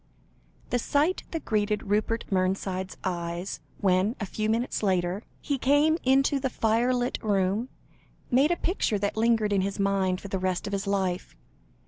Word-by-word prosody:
The 245 Hz, -, +2 dB
sight 295 Hz, +9 st, +1 dB
that 325 Hz, -2 st, -5 dB
greeted 210 Hz, -1 st, 0 dB
Rupert 215 Hz, +3 st, 0 dB
Mernside's 185 Hz, 0 st, -1 dB
eyes, 175 Hz, 0 st, -3 dB, 0.2 s
when, 190 Hz, +3 st, +2 dB
a 205 Hz, -, -2 dB
few 215 Hz, +2 st, -2 dB
minutes 230 Hz, +3 st, 0 dB
later, 185 Hz, -1 st, +1 dB, 0.2 s
he 280 Hz, -2 st, -1 dB
came 295 Hz, +5 st, +3 dB
into 275 Hz, +2 st, +3 dB
the 265 Hz, 0 st, -1 dB
firelit 245 Hz, +2 st, +1 dB
room, 205 Hz, +3 st, +1 dB, 0.6 s
made 270 Hz, +5 st, +4 dB
a 345 Hz, -, +2 dB
picture 340 Hz, -, 0 dB
that 200 Hz, 0 st, -1 dB
lingered 220 Hz, -2 st, +2 dB
in 195 Hz, -, +3 dB
his 195 Hz, +1 st, -2 dB
mind 195 Hz, -2 st, +1 dB
for 200 Hz, -, -8 dB
the 195 Hz, -1 st, -2 dB
rest 185 Hz, -1 st, -1 dB
of 200 Hz, -, -4 dB
his 200 Hz, 0 st, -2 dB
life. 190 Hz, -, -1 dB
205 Hz, 160 wpm, -27 LUFS, 190-245 Hz, 0.6 s, made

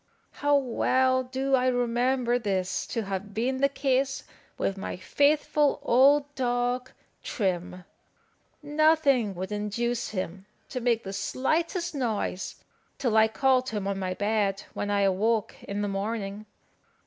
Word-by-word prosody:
How 290 Hz, 0 st, +2 dB
well 260 Hz, 0 st, +2 dB
do 265 Hz, +2 st, -3 dB
I 255 Hz, -1 st, +4 dB
remember 245 Hz, 0 st, +1 dB
this 190 Hz, -4 st, -1 dB
to 230 Hz, -, -2 dB
have 195 Hz, +1 st, -5 dB
been 250 Hz, +4 st, 0 dB
the 275 Hz, +1 st, +3 dB
case 270 Hz, -1 st, 0 dB, 0.3 s
with 195 Hz, -, -1 dB
my 195 Hz, -, -5 dB
faithful 290 Hz, +6 st, +2 dB
old 280 Hz, +3 st, +4 dB
dog 245 Hz, -1 st, -1 dB, 0.3 s
Trim! 180 Hz, -3 st, -2 dB, 0.8 s
Nothing 295 Hz, -8 st, +3 dB
would 185 Hz, +2 st, -5 dB
induce 220 Hz, +3 st, -2 dB
him 190 Hz, -1 st, -5 dB, 0.2 s
to 255 Hz, -, -4 dB
make 235 Hz, -1 st, +1 dB
the 195 Hz, -, -6 dB
slightest 335 Hz, -, -1 dB
noise 225 Hz, -8 st, -2 dB, 0.4 s
till 240 Hz, -5 st, 0 dB
I 220 Hz, 0 st, +6 dB
called 255 Hz, +2 st, +2 dB
him 205 Hz, -3 st, -3 dB
on 200 Hz, -1 st, -2 dB
my 185 Hz, -1 st, -2 dB
bed, 205 Hz, -1 st, 0 dB
when 205 Hz, -, -3 dB
I 205 Hz, 0 st, +2 dB
awoke 205 Hz, +3 st, +1 dB
in 205 Hz, +1 st, -3 dB
the -, -, 0 dB
morning. 200 Hz, +1 st, -3 dB
235 Hz, 135 wpm, -27 LUFS, 200-265 Hz, 0.8 s, I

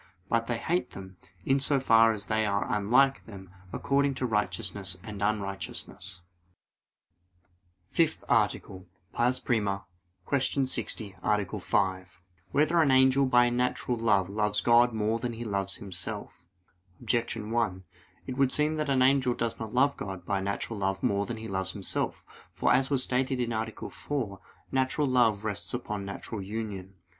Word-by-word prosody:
But 115 Hz, 0 st, +1 dB
they 120 Hz, -, -1 dB
hate 175 Hz, +9 st, -1 dB
them, 95 Hz, -1 st, -10 dB, 0.3 s
in 135 Hz, +1 st, +3 dB
so 140 Hz, 0 st, +3 dB
far 115 Hz, -3 st, +5 dB
as 105 Hz, -2 st, -4 dB
they 110 Hz, 0 st, +1 dB
are 100 Hz, -1 st, 0 dB
unlike 125 Hz, +7 st, +3 dB
them 95 Hz, -4 st, -11 dB, 0.2 s
according 140 Hz, +4 st, +1 dB
to 130 Hz, -, -2 dB
righteousness 100 Hz, -4 st, -1 dB
and 105 Hz, -2 st, -7 dB
unrighteousness. 100 Hz, -2 st, -3 dB, 1.7 s
_______________________ -, -, -26 dB
FIFTH 165 Hz, -2 st, +2 dB
ARTICLE 95 Hz, -1 st, 0 dB, 0.3 s
[I, 120 Hz, +1 st, +3 dB
Q. 105 Hz, +3 st, -1 dB
60, 110 Hz, -5 st, -3 dB
Art. 105 Hz, 0 st, 0 dB
5] 95 Hz, -2 st, -1 dB, 0.3 s
Whether 160 Hz, -, +3 dB
an 150 Hz, -, +3 dB
angel 130 Hz, +1 st, +5 dB
by 120 Hz, -1 st, +4 dB
natural 125 Hz, 0 st, 0 dB
love 105 Hz, -5 st, +2 dB
loves 105 Hz, +1 st, 0 dB
God 120 Hz, +1 st, +5 dB
more 110 Hz, +1 st, 0 dB
than 120 Hz, 0 st, -3 dB
he 115 Hz, +1 st, -6 dB
loves 100 Hz, -2 st, -2 dB
himself? 95 Hz, -5 st, -7 dB, 0.5 s
Objection 115 Hz, -2 st, -1 dB
1: 110 Hz, -6 st, 0 dB, 0.4 s
It 130 Hz, -, -5 dB
would 135 Hz, -2 st, +3 dB
seem 150 Hz, +1 st, +1 dB
that 155 Hz, -1 st, -1 dB
the 140 Hz, -, +2 dB
angel 130 Hz, -2 st, +3 dB
does 115 Hz, -1 st, -2 dB
not 110 Hz, -1 st, -5 dB
love 140 Hz, +4 st, +2 dB
God 95 Hz, -3 st, -6 dB
by 100 Hz, 0 st, -1 dB
natural 100 Hz, +2 st, -3 dB
love 95 Hz, 0 st, -1 dB
more 100 Hz, 0 st, +1 dB
than 120 Hz, -, -4 dB
he 110 Hz, 0 st, -7 dB
loves 95 Hz, -2 st, -3 dB
himself. 100 Hz, -2 st, -1 dB, 0.3 s
For, -, -, +2 dB
as 135 Hz, 0 st, +3 dB
was 135 Hz, -3 st, +2 dB
stated 130 Hz, +1 st, 0 dB
(A. 115 Hz, -2 st, -1 dB, 0.2 s
4), 115 Hz, -10 st, -4 dB, 0.3 s
natural 130 Hz, +3 st, +1 dB
love 115 Hz, -5 st, +3 dB
rests 105 Hz, +2 st, -2 dB
upon 105 Hz, -5 st, -4 dB
natural 100 Hz, +2 st, -6 dB
union. 100 Hz, -2 st, -5 dB
110 Hz, 155 wpm, -28 LUFS, 100-130 Hz, 1.7 s, far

